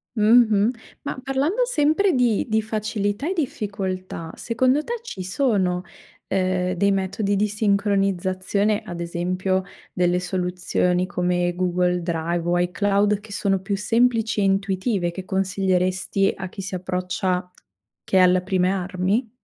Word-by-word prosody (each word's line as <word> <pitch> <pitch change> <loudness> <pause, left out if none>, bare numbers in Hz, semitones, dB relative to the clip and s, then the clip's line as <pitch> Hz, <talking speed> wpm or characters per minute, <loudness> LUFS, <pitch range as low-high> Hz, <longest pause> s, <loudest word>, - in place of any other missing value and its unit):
Mh-mh. 220 0 +5 0.3
Ma - - -4
parlando 285 - +1
sempre 335 -2 +2
di 245 -5 +2
di 220 0 +2
facilità 215 - -2
e - - 0
difficoltà, 195 - -4
secondo 255 +5 +1
te 475 - -4
ci 190 - -6
sono, 185 -4 0 0.4
ehm, 185 -1 0
dei 200 +2 +2
metodi 195 +1 0
di 210 +2 +2
sincronizzazione, 200 0 +1
ad 175 -5 -7
esempio 185 +2 -1 0.3
delle 180 0 +2
soluzioni 180 0 0
come 175 -1 0
Google 180 0 +1
Drive 170 0 -2
o 175 0 +2
iCloud 200 +4 +1
che 210 0 -14
sono 195 -1 0
più 195 +1 -2
semplici 225 0 +1
e - - +2
intuitive 195 -1 0
che 185 +2 -7
consiglieresti 190 0 0
a 185 -1 -6
chi 195 - -8
si 190 - -6
approccia 180 0 -2 0.5
che 190 - +1
è - - +7
alla 180 0 +5
prime 185 -1 +1
armi? 190 +5 -1
195 Hz, 135 wpm, -23 LUFS, 180-215 Hz, 0.5 s, è